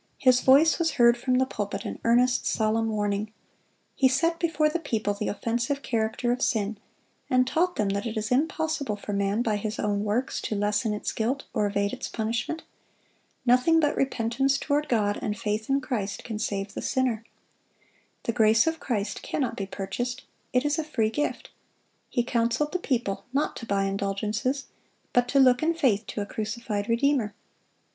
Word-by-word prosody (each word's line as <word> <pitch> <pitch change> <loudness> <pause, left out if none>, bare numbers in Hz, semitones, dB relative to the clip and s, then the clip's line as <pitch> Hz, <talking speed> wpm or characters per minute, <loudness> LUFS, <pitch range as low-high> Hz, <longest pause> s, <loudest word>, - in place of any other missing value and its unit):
His 255 -1 +4
voice 290 +6 +5
was 325 -2 +1
heard 235 -2 +5
from 250 +1 0
the 260 - +3
pulpit 205 -5 -4
in - - -5
earnest, 245 +2 +3
solemn 225 +1 +1
warning. 210 0 -1 0.6
He 265 - +4
set 330 +6 +1
before 320 -3 +2
the 305 +3 -1
people 220 -9 -1
the 205 +1 -3
offensive 240 +5 -1
character 225 +1 0
of 250 +1 -1
sin, 210 -3 0 0.5
and 255 0 +4
taught 350 +7 +1
them 210 -2 0
that 200 +3 -1
it 225 0 -4
is 215 +2 -2
impossible 295 -3 0
for 205 0 -6
man, 200 +3 +1
by 215 -3 +1
his 215 +1 -4
own 205 -1 0
works, 215 +5 -1
to 215 - -2
lessen 210 +2 +1
its 210 - -3
guilt 250 +5 -1
or 210 - +1
evade 200 0 0
its - - -4
punishment. 230 +8 -2 0.8
Nothing 255 +7 +5
but 295 -2 +2
repentance 270 +1 +1
toward 295 +1 0
God 205 -4 +1
and 210 -1 -2
faith 215 +2 -2
in 275 +1 +3
Christ 210 -6 -3
can 220 -3 -5
save 200 -1 -2
the - - -5
sinner. 255 -4 0 1.0
The 230 - -1
grace 220 0 +4
of 325 0 -1
Christ 210 -6 -2
cannot 250 -5 -2
be 195 -4 -4
purchased; 240 +7 -4 0.3
it 250 +2 +2
is 295 +2 +1
a - - 0
free 230 -8 0
gift. 295 +6 -2 0.6
He 240 - +1
counseled 240 +5 0
the 365 - -1
people 240 - -2
not 285 +2 0
to 230 - -8
buy 200 -1 +1
indulgences, 205 +7 -1 0.5
but 245 0 +3
to 275 - +2
look 255 -2 +5
in 330 +1 +1
faith 230 -10 +1
to 205 - -4
a - - -2
crucified 215 0 -3
Redeemer. 235 -3 +1
235 Hz, 180 wpm, -26 LUFS, 210-270 Hz, 1.0 s, voice